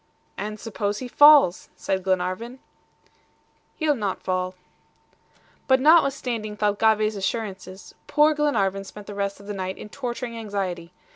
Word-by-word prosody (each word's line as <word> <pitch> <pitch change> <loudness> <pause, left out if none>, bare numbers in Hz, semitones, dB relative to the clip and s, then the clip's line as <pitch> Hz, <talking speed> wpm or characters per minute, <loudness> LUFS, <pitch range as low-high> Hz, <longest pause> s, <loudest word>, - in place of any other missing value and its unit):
"And 210 +1 -5
suppose 205 -2 -3
he 255 - -6
falls?" 290 - +6
said 190 0 -2
Glenarvan. 185 +6 -2 1.2
"He'll 310 -2 +1
not 205 -7 -3
fall." 185 0 -2 1.1
But 260 0 +4
notwithstanding 260 -8 +2
Thalcave's 215 +1 +2
assurances, 195 -2 -5
poor 300 +1 +4
Glenarvan 205 -11 0
spent 205 +1 -11
the 205 - -8
rest 200 0 -3
of 200 - -14
the 205 - -5
night 190 -1 -4
in - - -10
torturing 245 -1 -5
anxiety. 195 -6 -4
210 Hz, 130 wpm, -24 LUFS, 195-245 Hz, 1.2 s, falls